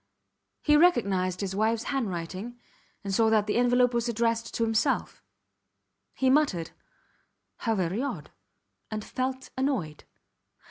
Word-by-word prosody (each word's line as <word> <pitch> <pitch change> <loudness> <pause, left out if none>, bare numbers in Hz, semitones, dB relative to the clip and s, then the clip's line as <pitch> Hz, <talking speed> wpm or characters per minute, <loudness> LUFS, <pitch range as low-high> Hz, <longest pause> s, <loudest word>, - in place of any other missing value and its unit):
He 300 - +4
recognized 200 - +2
his 190 -1 -3
wifes 220 +2 +1
handwriting 210 -2 -4 0.4
and 195 -1 -3
saw 220 +3 +4
that 215 -2 +3
the 210 - 0
envelope 245 0 +3
was 235 0 0
addressed 230 0 0
to 230 - +1
himself. 225 +5 0 0.9
He 265 - +1
muttered, 260 - +2 0.9
How 225 -1 -1
very 185 +3 -1
odd, 280 - -5 0.6
and 215 -1 -4
felt 260 0 -3
annoyed. 255 - -2
230 Hz, 125 wpm, -27 LUFS, 195-255 Hz, 0.9 s, He